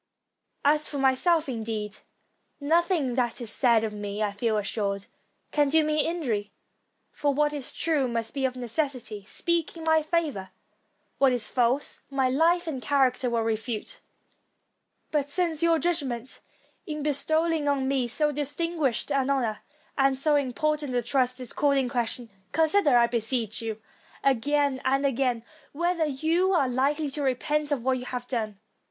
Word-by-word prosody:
As 300 Hz, +1 st, +3 dB
for 290 Hz, -, -4 dB
my 265 Hz, -1 st, +4 dB
self, 325 Hz, +3 st, +2 dB
indeed, 220 Hz, -4 st, -4 dB, 0.6 s
nothing 320 Hz, -2 st, +1 dB
that 240 Hz, -1 st, 0 dB
is 235 Hz, -3 st, -4 dB
said 235 Hz, -4 st, +3 dB
of 220 Hz, -1 st, -2 dB
me, 205 Hz, 0 st, -3 dB
I 205 Hz, -, 0 dB
feel 215 Hz, +2 st, 0 dB
assured, 200 Hz, -1 st, -2 dB, 0.5 s
can 295 Hz, -2 st, +2 dB
do 315 Hz, +2 st, +4 dB
me 305 Hz, 0 st, +1 dB
injury; 240 Hz, -12 st, -2 dB, 0.6 s
for 285 Hz, -2 st, 0 dB
what 295 Hz, +1 st, +2 dB
is 285 Hz, -3 st, -2 dB
true 300 Hz, -5 st, +1 dB
must 230 Hz, 0 st, -3 dB
of 265 Hz, -2 st, 0 dB
necessity 245 Hz, -4 st, -3 dB
speak 340 Hz, +3 st, -1 dB
in 325 Hz, -, -8 dB
my 320 Hz, 0 st, +4 dB
favor; 305 Hz, -, -1 dB, 0.7 s
what 270 Hz, -1 st, +5 dB
is 245 Hz, -3 st, -2 dB
false, 250 Hz, +3 st, 0 dB
my 270 Hz, -2 st, +1 dB
life 335 Hz, +6 st, +3 dB
and 290 Hz, -6 st, -4 dB
character 255 Hz, 0 st, +2 dB
will 230 Hz, -1 st, 0 dB
refute. 225 Hz, -, -3 dB, 1.1 s
But 290 Hz, -2 st, 0 dB
since 330 Hz, 0 st, +1 dB
your 335 Hz, -1 st, +4 dB
judgment, 275 Hz, -8 st, -2 dB, 0.5 s
in 305 Hz, -2 st, -4 dB
bestowing 315 Hz, +2 st, +1 dB
on 275 Hz, -2 st, +1 dB
me 265 Hz, -2 st, +1 dB
so 295 Hz, +5 st, +1 dB
distinguished 295 Hz, -2 st, -1 dB
an 275 Hz, -1 st, +1 dB
honor 240 Hz, -6 st, 0 dB, 0.4 s
and 270 Hz, -1 st, +3 dB
so 295 Hz, +2 st, +2 dB
important 290 Hz, 0 st, 0 dB
a 245 Hz, -, +1 dB
trust, 255 Hz, +1 st, 0 dB
is 250 Hz, -2 st, -7 dB
called 285 Hz, -1 st, +2 dB
in 265 Hz, -2 st, +1 dB
question, 240 Hz, -1 st, -3 dB, 0.2 s
consider, 320 Hz, -4 st, +4 dB
I 235 Hz, -, +6 dB
beseech 235 Hz, -1 st, -1 dB
you, 220 Hz, -1 st, -4 dB, 0.4 s
again 275 Hz, +1 st, +1 dB
and 275 Hz, +2 st, +1 dB
again, 250 Hz, -3 st, 0 dB, 0.3 s
whether 340 Hz, +1 st, 0 dB
you 320 Hz, +7 st, +1 dB
are 285 Hz, -7 st, +3 dB
likely 280 Hz, +4 st, 0 dB
to 290 Hz, -, -3 dB
repent 295 Hz, +3 st, 0 dB
of 270 Hz, -5 st, 0 dB
what 260 Hz, 0 st, +1 dB
you 250 Hz, -, -7 dB
have 250 Hz, -1 st, -5 dB
done. 215 Hz, -5 st, -3 dB
270 Hz, 160 wpm, -27 LUFS, 240-300 Hz, 1.1 s, I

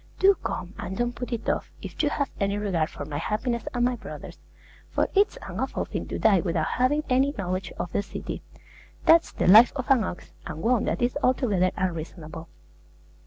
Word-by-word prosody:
Do 395 Hz, +1 st, +6 dB
come, 180 Hz, -, -4 dB
and 190 Hz, -, -5 dB
don't 240 Hz, 0 st, 0 dB
put 245 Hz, +1 st, -6 dB
it 235 Hz, -2 st, -3 dB
off, -, -, -1 dB
if -, -, -4 dB
you 300 Hz, -, +2 dB
have 280 Hz, -2 st, -1 dB
any 200 Hz, 0 st, 0 dB
regard 185 Hz, -7 st, 0 dB
for 145 Hz, -, -7 dB
my 145 Hz, 0 st, -4 dB
happiness 235 Hz, -, -2 dB
and 245 Hz, -1 st, +1 dB
my 250 Hz, 0 st, +1 dB
brothers'; -, -, -9 dB, 0.5 s
for -, -, +1 dB
it's 405 Hz, +1 st, +3 dB
an -, -, -6 dB
awful -, -, -2 dB
thing -, -, -5 dB
to -, -, -4 dB
die 205 Hz, -4 st, +4 dB
without 165 Hz, -3 st, 0 dB
having 275 Hz, -, +1 dB
any 270 Hz, +2 st, +2 dB
knowledge 185 Hz, -1 st, -3 dB
of 175 Hz, -, -5 dB
the -, -, +1 dB
city. 195 Hz, -, -6 dB, 0.6 s
That's 330 Hz, +1 st, +6 dB
the -, -, -2 dB
life 220 Hz, +6 st, +9 dB
of 265 Hz, 0 st, -2 dB
an 255 Hz, -5 st, +5 dB
ox; 175 Hz, -, -6 dB, 0.2 s
and 155 Hz, +2 st, -6 dB
one 240 Hz, -1 st, +2 dB
that -, -, -1 dB
is 245 Hz, +4 st, 0 dB
altogether 215 Hz, -9 st, +2 dB
unreasonable. 165 Hz, -2 st, -4 dB
215 Hz, 200 wpm, -26 LUFS, 180-255 Hz, 0.6 s, life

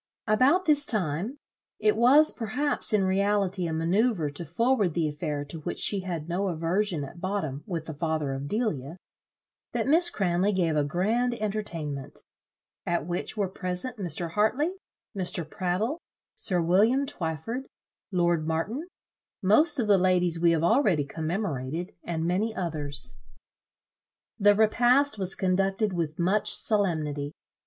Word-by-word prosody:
About 260 Hz, +12 st, +3 dB
this 295 Hz, -3 st, +4 dB
time 205 Hz, -, 0 dB, 0.4 s
it 215 Hz, 0 st, +2 dB
was 270 Hz, +7 st, +6 dB
perhaps 250 Hz, +6 st, -1 dB
in 210 Hz, -2 st, +3 dB
reality 195 Hz, -1 st, +1 dB
a -, -, -3 dB
manoeuvre 170 Hz, +1 st, +1 dB
to 170 Hz, +4 st, -5 dB
forward 210 Hz, -, +1 dB
the 165 Hz, -2 st, +1 dB
affair, 150 Hz, -1 st, -3 dB
to 160 Hz, +3 st, -8 dB
which 155 Hz, -, -5 dB
she 200 Hz, -, +2 dB
had 175 Hz, -4 st, -5 dB
no 185 Hz, +4 st, -1 dB
aversion 170 Hz, 0 st, -1 dB
at 170 Hz, +5 st, -10 dB
bottom, 160 Hz, -8 st, -3 dB
with 170 Hz, -5 st, -4 dB
the 160 Hz, -, -6 dB
father 155 Hz, -2 st, -2 dB
of 135 Hz, +1 st, -5 dB
Delia 165 Hz, -, -2 dB, 0.8 s
that -, -, 0 dB
Miss 335 Hz, +4 st, +5 dB
Cranley 195 Hz, -, +1 dB
gave 170 Hz, -4 st, +1 dB
a 150 Hz, -, +2 dB
grand 220 Hz, -, 0 dB
entertainment, 165 Hz, -, -5 dB, 0.6 s
at 170 Hz, -3 st, -1 dB
which 175 Hz, +5 st, -3 dB
were 200 Hz, -2 st, +1 dB
present 185 Hz, +6 st, -5 dB
Mr. 170 Hz, -3 st, -4 dB
Hartley, 235 Hz, -, +1 dB, 0.4 s
Mr. 175 Hz, -4 st, -2 dB
Prattle, 185 Hz, -, -2 dB, 0.3 s
sir 180 Hz, -2 st, -2 dB
William 210 Hz, +11 st, +3 dB
Twyford, 225 Hz, -, -4 dB, 0.4 s
lord 175 Hz, -3 st, +1 dB
Martin, 210 Hz, -, -2 dB, 0.6 s
most 295 Hz, -, +4 dB
of 240 Hz, -, +1 dB
the 205 Hz, -2 st, +4 dB
ladies 180 Hz, -2 st, +2 dB
we 170 Hz, 0 st, +4 dB
have 165 Hz, -1 st, +2 dB
already 175 Hz, -, +3 dB
commemorated, 160 Hz, 0 st, -3 dB
and 165 Hz, -1 st, -3 dB
many 205 Hz, +6 st, 0 dB
others. 150 Hz, -5 st, -3 dB, 1.2 s
The 205 Hz, 0 st, +5 dB
repast 240 Hz, +4 st, +3 dB
was 190 Hz, -1 st, -1 dB
conducted 195 Hz, +2 st, 0 dB
with 160 Hz, -3 st, -2 dB
much 190 Hz, +4 st, +2 dB
solemnity. 155 Hz, -8 st, +1 dB
185 Hz, 140 wpm, -27 LUFS, 165-215 Hz, 1.2 s, was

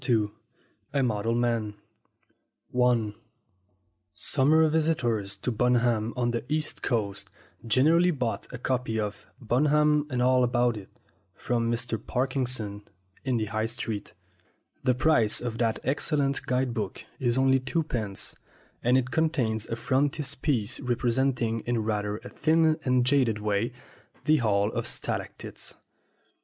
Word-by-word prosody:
II 110 Hz, -3 st, +2 dB, 0.6 s
A 140 Hz, -2 st, +2 dB
MODEL 115 Hz, -1 st, 0 dB
MAN 115 Hz, -3 st, 0 dB, 2.4 s
SUMMER 155 Hz, +7 st, +3 dB
visitors 120 Hz, -11 st, 0 dB
to 100 Hz, +6 st, -3 dB
Bunham 120 Hz, -1 st, +2 dB
on 120 Hz, -1 st, +1 dB
the 120 Hz, -, -2 dB
East 155 Hz, 0 st, -1 dB
Coast 100 Hz, -5 st, -2 dB, 0.4 s
generally 160 Hz, +10 st, +4 dB
bought 125 Hz, -9 st, -2 dB
a 125 Hz, -, -5 dB
copy 125 Hz, -3 st, -1 dB
of 105 Hz, 0 st, -4 dB
"Bunham 150 Hz, +5 st, +3 dB
and 125 Hz, -3 st, -2 dB
All 125 Hz, +1 st, +4 dB
About 120 Hz, -1 st, +2 dB
It" 100 Hz, -3 st, -9 dB, 0.5 s
from 115 Hz, -1 st, 0 dB
Mr. 120 Hz, -1 st, -2 dB
Parkinson 125 Hz, -5 st, -2 dB, 0.4 s
in 130 Hz, -3 st, 0 dB
the 110 Hz, -, 0 dB
High 110 Hz, +1 st, -1 dB
Street. 115 Hz, -2 st, -5 dB, 0.7 s
The 130 Hz, -2 st, +3 dB
price 125 Hz, -6 st, +3 dB
of 120 Hz, -2 st, -4 dB
that 115 Hz, -2 st, +1 dB
excellent 140 Hz, 0 st, 0 dB
guide 125 Hz, -1 st, +1 dB
book -, -, -4 dB
is 120 Hz, -1 st, +1 dB
only 135 Hz, 0 st, +4 dB
two 130 Hz, +6 st, -1 dB
pence, 110 Hz, -9 st, -4 dB, 0.5 s
and 125 Hz, +2 st, +4 dB
it 125 Hz, -1 st, -1 dB
contains 125 Hz, -10 st, 0 dB
a 115 Hz, -, -2 dB
frontispiece 135 Hz, -2 st, 0 dB
representing, 120 Hz, -1 st, 0 dB
in 120 Hz, -2 st, +1 dB
rather 105 Hz, -1 st, -1 dB
a -, -, -8 dB
thin 160 Hz, 0 st, +2 dB
and 125 Hz, -1 st, +2 dB
jaded 125 Hz, -5 st, +3 dB
way, 105 Hz, +2 st, 0 dB, 0.5 s
the 155 Hz, +1 st, +5 dB
Hall 105 Hz, -3 st, +2 dB
of -, -, -3 dB
Stalactites. -, -, -5 dB
125 Hz, 130 wpm, -27 LUFS, 110-135 Hz, 2.4 s, the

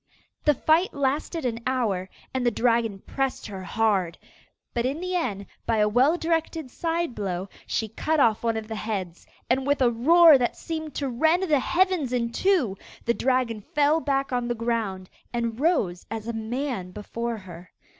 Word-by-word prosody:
The 295 Hz, -, +5 dB
fight 320 Hz, +7 st, +2 dB
lasted 285 Hz, +3 st, -1 dB
an 235 Hz, -1 st, -2 dB
hour 210 Hz, -8 st, 0 dB, 0.2 s
and 260 Hz, -1 st, -1 dB
the 240 Hz, -, +4 dB
dragon 230 Hz, -3 st, +1 dB
pressed 270 Hz, -1 st, -2 dB
her 195 Hz, -3 st, -6 dB
hard. 195 Hz, -5 st, +1 dB, 0.6 s
But 235 Hz, -, 0 dB
in 270 Hz, +5 st, -1 dB
the 365 Hz, +1 st, -3 dB
end, 205 Hz, -, -1 dB, 0.2 s
by 230 Hz, -, +2 dB
a 210 Hz, 0 st, +4 dB
well 255 Hz, +10 st, +3 dB
directed 325 Hz, -4 st, -1 dB
side 335 Hz, -2 st, -1 dB
blow, 190 Hz, -3 st, -3 dB, 0.2 s
she 220 Hz, -, -1 dB
cut 310 Hz, +8 st, -1 dB
off 225 Hz, -5 st, +4 dB
one 230 Hz, -1 st, 0 dB
of 220 Hz, -1 st, -5 dB
the 220 Hz, -, -5 dB
heads, 195 Hz, -6 st, -4 dB, 0.2 s
and 260 Hz, +2 st, +1 dB
with 285 Hz, 0 st, +2 dB
a 250 Hz, -2 st, +4 dB
roar 310 Hz, +5 st, +7 dB
that 240 Hz, -, 0 dB
seemed 315 Hz, -3 st, -5 dB
to 280 Hz, -, -1 dB
rend 315 Hz, +9 st, +2 dB
the 305 Hz, -6 st, +3 dB
heavens 345 Hz, -3 st, +1 dB
in 235 Hz, -2 st, 0 dB
two, 280 Hz, -, +1 dB, 0.3 s
the 235 Hz, -, +3 dB
dragon 250 Hz, -4 st, 0 dB
fell 295 Hz, +7 st, +2 dB
back 275 Hz, -3 st, -1 dB
on 245 Hz, -1 st, 0 dB
the 240 Hz, -, -1 dB
ground, 225 Hz, -5 st, -2 dB, 0.3 s
and 235 Hz, -1 st, -2 dB
rose 265 Hz, -, +1 dB
as 225 Hz, 0 st, -5 dB
a 235 Hz, -, -2 dB
man 230 Hz, -3 st, -3 dB
before 230 Hz, +4 st, -4 dB
her. 180 Hz, -3 st, -11 dB
240 Hz, 180 wpm, -25 LUFS, 220-295 Hz, 0.6 s, roar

